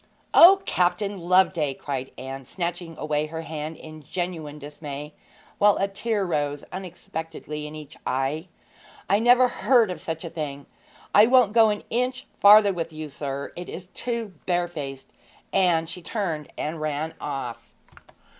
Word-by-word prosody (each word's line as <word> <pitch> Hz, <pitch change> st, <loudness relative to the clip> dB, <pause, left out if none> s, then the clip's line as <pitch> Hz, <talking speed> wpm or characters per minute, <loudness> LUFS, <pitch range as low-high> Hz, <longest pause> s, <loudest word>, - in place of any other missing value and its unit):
'O, 385 Hz, +3 st, +9 dB
Captain 185 Hz, +3 st, 0 dB
Loveday!' 175 Hz, -5 st, +3 dB
cried 135 Hz, -2 st, -4 dB
Anne, 135 Hz, +1 st, -6 dB
snatching 170 Hz, +2 st, -4 dB
away 150 Hz, 0 st, -1 dB
her 160 Hz, +1 st, -6 dB
hand 155 Hz, 0 st, -5 dB
in 155 Hz, -1 st, -11 dB
genuine 160 Hz, -2 st, -4 dB
dismay, 145 Hz, 0 st, -7 dB, 0.5 s
while 205 Hz, 0 st, +5 dB
a 195 Hz, -, +1 dB
tear 200 Hz, +1 st, -1 dB
rose 145 Hz, -4 st, -1 dB
unexpectedly 160 Hz, -4 st, -6 dB
to 155 Hz, -, -9 dB
each 150 Hz, -2 st, -11 dB
eye. 135 Hz, +6 st, -1 dB, 0.6 s
'I 200 Hz, +2 st, +3 dB
never 245 Hz, +2 st, +6 dB
heard 240 Hz, -5 st, +3 dB
of 165 Hz, -4 st, -6 dB
such 160 Hz, +1 st, -4 dB
a -, -, -4 dB
thing! 145 Hz, -3 st, -5 dB, 0.5 s
I 210 Hz, +2 st, +8 dB
won't 245 Hz, -4 st, +5 dB
go 225 Hz, -2 st, +6 dB
an 210 Hz, 0 st, -2 dB
inch 250 Hz, +2 st, -1 dB
further 205 Hz, 0 st, +8 dB
with 165 Hz, -2 st, -4 dB
you, 155 Hz, -1 st, -7 dB
sir; 140 Hz, 0 st, -5 dB
it 175 Hz, 0 st, -7 dB
is 185 Hz, +1 st, -8 dB
too 235 Hz, -4 st, -4 dB
barefaced!' 170 Hz, -7 st, -3 dB, 0.4 s
And 170 Hz, -4 st, +3 dB
she 180 Hz, +2 st, -7 dB
turned 165 Hz, -5 st, -3 dB
and 155 Hz, +1 st, -3 dB
ran 155 Hz, +1 st, -2 dB
off. 135 Hz, -5 st, -5 dB
165 Hz, 150 wpm, -25 LUFS, 150-195 Hz, 0.6 s, O